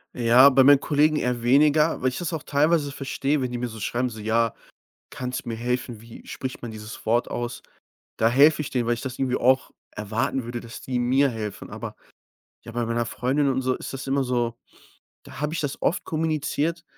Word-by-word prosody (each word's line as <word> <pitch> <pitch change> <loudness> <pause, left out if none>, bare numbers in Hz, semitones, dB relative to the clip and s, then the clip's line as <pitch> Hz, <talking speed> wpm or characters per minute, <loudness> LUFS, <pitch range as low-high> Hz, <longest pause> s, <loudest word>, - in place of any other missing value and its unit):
Ja, 125 +3 +7
bei 135 0 +5
meinen 140 -1 +7
Kollegen 150 +1 +2
eher 125 -4 -1
weniger, 150 +5 +3
weil 130 - +2
ich 125 - -6
das 175 -1 -3
auch 155 - -4
teilweise 150 0 +2
verstehe, 140 +1 -1
wenn 125 - -1
die 125 - -3
mir 120 0 -3
so 110 0 -9
schreiben, 120 +4 -1
so: 110 - -9
„Ja, 110 +1 +1 0.6
kannst 125 0 -5
du - - -8
mir 115 - -2
helfen? 120 0 -3
Wie 115 +1 -13
spricht 130 -1 -6
man 115 - -6
dieses 110 +1 -9
Wort 120 +2 +1
aus?“ 120 -1 -4 0.6
Da 110 - +3
helfe 145 +5 +5
ich 145 - -5
denen, 120 -3 -1
weil 120 - +3
ich 120 - -5
das 130 -2 -6
irgendwie 130 -2 0
auch 130 +2 +2 0.2
erwarten 115 +5 -2
würde, 120 0 -5
dass 115 0 -9
die 130 -1 -3
mir 130 +3 +3
helfen. 110 -4 -6
Aber, - - -7 0.7
ja, 115 - -9
bei 120 0 -1
meiner 115 0 -1
Freundin 135 +4 0
und 130 -1 +1
so 130 0 0
ist - - -7
das 135 0 -6
immer 135 0 +1
so: 120 -2 -1 0.7
Da 135 - -11
habe 150 +1 -1
ich 170 - -3
das 145 -2 -4
oft 180 - 0
kommuniziert, 160 +1 -1
125 Hz, 215 wpm, -24 LUFS, 120-140 Hz, 0.7 s, Ja